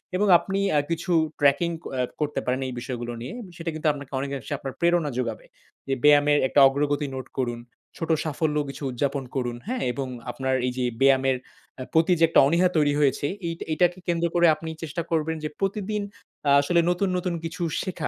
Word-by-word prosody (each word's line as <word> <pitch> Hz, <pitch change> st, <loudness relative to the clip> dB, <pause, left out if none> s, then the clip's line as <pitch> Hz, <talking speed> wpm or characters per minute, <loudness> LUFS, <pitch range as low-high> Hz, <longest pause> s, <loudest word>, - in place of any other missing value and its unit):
এবং 205 Hz, +3 st, +2 dB
আপনি 195 Hz, 0 st, -3 dB, 0.2 s
আ -, -, +6 dB
কিছু 170 Hz, +2 st, -2 dB, 0.3 s
ট্র্যাকিং 145 Hz, +4 st, +3 dB, 0.2 s
অ্যা 130 Hz, -1 st, 0 dB, 0.2 s
করতে 150 Hz, -1 st, -1 dB
পারেন 125 Hz, +1 st, 0 dB
এই 130 Hz, -, -5 dB
বিষয়গুলো 120 Hz, -1 st, -5 dB
নিয়ে। 125 Hz, -, -6 dB, 0.2 s
সেটা 165 Hz, -1 st, -4 dB
কিন্তু 155 Hz, 0 st, -2 dB
আপনাকে 140 Hz, -2 st, -10 dB
অনেকাংশে 140 Hz, +1 st, -4 dB
আপনার 135 Hz, -1 st, -6 dB
প্রেরণা 170 Hz, -3 st, +2 dB
যোগাবে। 115 Hz, -3 st, -3 dB, 0.4 s
যে 135 Hz, -, 0 dB
ব্যায়ামের 145 Hz, 0 st, +6 dB
একটা 145 Hz, -, +2 dB
অগ্রগতি 145 Hz, +1 st, 0 dB
নোট 130 Hz, -, -6 dB
করুন। 120 Hz, -2 st, -1 dB, 0.4 s
ছোট 165 Hz, -, -4 dB, 0.2 s
সাফল্য 155 Hz, 0 st, -1 dB
কিছু 140 Hz, +2 st, -8 dB
উদযাপন 140 Hz, +2 st, -1 dB
করুন। 120 Hz, -2 st, -2 dB
হ্যাঁ? 255 Hz, +2 st, -2 dB
এবং 135 Hz, +2 st, -3 dB, 0.2 s
আপনার 130 Hz, +2 st, -2 dB
এই -, -, 0 dB
যে 130 Hz, -, 0 dB, 0.2 s
ব্যায়ামের 135 Hz, -1 st, +4 dB, 0.4 s
আ -, -, -2 dB
প্রতি 165 Hz, +3 st, +4 dB
যে -, -, +4 dB
একটা -, -, +5 dB
অনীহা 170 Hz, +4 st, +3 dB
তৈরি 145 Hz, -2 st, +3 dB
হয়েছে, 145 Hz, 0 st, +2 dB, 0.2 s
এই 165 Hz, -, -2 dB, 0.2 s
এটাকে 175 Hz, +3 st, +2 dB
কেন্দ্র 170 Hz, -1 st, +1 dB
করে 175 Hz, 0 st, +5 dB
আপনি 160 Hz, +1 st, -7 dB
চেষ্টা 165 Hz, +2 st, -3 dB
করবেন 160 Hz, 0 st, 0 dB
যে 155 Hz, -, -2 dB
প্রতিদিন 205 Hz, +2 st, -1 dB, 0.5 s
আ -, -, +5 dB
আসলে 170 Hz, +4 st, +2 dB
নতুন, 180 Hz, +2 st, +1 dB
নতুন 180 Hz, 0 st, -2 dB
কিছু 170 Hz, +3 st, -6 dB, 0.2 s
শেখা 180 Hz, -5 st, -3 dB
150 Hz, 190 wpm, -25 LUFS, 135-170 Hz, 0.5 s, আ